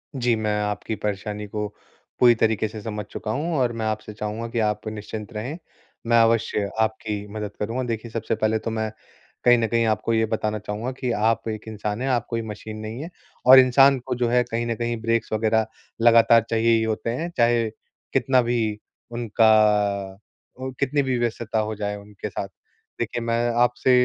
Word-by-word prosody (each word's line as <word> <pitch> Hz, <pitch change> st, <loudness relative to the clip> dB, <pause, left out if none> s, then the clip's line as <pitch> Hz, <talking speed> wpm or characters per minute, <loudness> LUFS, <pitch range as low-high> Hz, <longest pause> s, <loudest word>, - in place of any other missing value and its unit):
जी, 120 Hz, -3 st, +2 dB
मैं 105 Hz, -1 st, -1 dB
आपकी 105 Hz, +1 st, -3 dB
परेशानी 105 Hz, 0 st, -4 dB
को 105 Hz, +1 st, -3 dB, 0.5 s
पूरी 120 Hz, -2 st, +7 dB
तरीके 110 Hz, -1 st, +1 dB
से 110 Hz, 0 st, -8 dB
समझ 105 Hz, -1 st, -5 dB
चुका 110 Hz, -, -5 dB
हूँ 155 Hz, +7 st, -2 dB
और 125 Hz, -2 st, +2 dB
मैं 110 Hz, -1 st, -3 dB
आपसे 110 Hz, 0 st, -3 dB
चाहूँगा 105 Hz, +2 st, -4 dB
कि 115 Hz, -, -2 dB
आप 105 Hz, 0 st, -1 dB
निश्चिंत 110 Hz, +1 st, -6 dB
रहें, 125 Hz, +10 st, -4 dB, 0.5 s
मैं 115 Hz, -, +4 dB
अवश्य 115 Hz, -3 st, +1 dB
आपकी 110 Hz, -2 st, -1 dB
मदद 105 Hz, -1 st, -4 dB
करूँगा। 115 Hz, +5 st, -2 dB
देखिए, 115 Hz, 0 st, -4 dB
सबसे 115 Hz, -, -2 dB
पहले 110 Hz, 0 st, +1 dB
तो 115 Hz, -, -4 dB
मैं 110 Hz, -1 st, -2 dB, 0.6 s
कहीं 120 Hz, 0 st, +7 dB
न 115 Hz, -, +1 dB
कहीं 115 Hz, 0 st, +1 dB
आपको 110 Hz, +1 st, 0 dB
ये 110 Hz, 0 st, +3 dB
बताना 110 Hz, -1 st, -2 dB
चाहूँगा 105 Hz, +4 st, -4 dB
कि 130 Hz, -2 st, -3 dB
आप 115 Hz, +1 st, +1 dB
एक 110 Hz, 0 st, -6 dB
इंसान 105 Hz, 0 st, -4 dB
है, 135 Hz, -, -1 dB
आप 120 Hz, -3 st, +1 dB
कोई 115 Hz, -1 st, -1 dB
मशीन 110 Hz, 0 st, -7 dB
नहीं 110 Hz, +4 st, -6 dB
है। 170 Hz, -, -7 dB, 0.4 s
और 130 Hz, +1 st, +11 dB
इंसान 135 Hz, +1 st, +6 dB
को 130 Hz, -, -2 dB
जो 120 Hz, 0 st, 0 dB
है 125 Hz, +1 st, +3 dB
कहीं 120 Hz, 0 st, -3 dB
न 115 Hz, -, -1 dB
कहीं 120 Hz, +1 st, -2 dB
ब्रेक्स 115 Hz, 0 st, 0 dB
वग़ैरह 110 Hz, 0 st, +2 dB, 0.4 s
लगातार 115 Hz, 0 st, +6 dB
चाहिए 115 Hz, 0 st, +2 dB
ही 110 Hz, -, +1 dB
होते 110 Hz, +1 st, -2 dB
हैं, 160 Hz, +9 st, -2 dB
चाहे 115 Hz, -1 st, +3 dB, 0.4 s
कितना 130 Hz, -1 st, +3 dB
भी 115 Hz, -3 st, -1 dB, 0.3 s
उनका 105 Hz, -4 st, +2 dB, 0.4 s
उ 130 Hz, 0 st, -4 dB
कितनी 140 Hz, +1 st, +1 dB
भी 130 Hz, -2 st, 0 dB
व्यस्तता 115 Hz, -1 st, -1 dB
हो 110 Hz, 0 st, -1 dB
जाए 105 Hz, 0 st, -3 dB
उनके 105 Hz, +1 st, -8 dB
साथ। 100 Hz, 0 st, -4 dB, 0.5 s
देखिए 120 Hz, -, -2 dB
मैं 115 Hz, +1 st, +1 dB
आपसे 125 Hz, +1 st, +2 dB
110 Hz, 190 wpm, -24 LUFS, 105-120 Hz, 0.6 s, और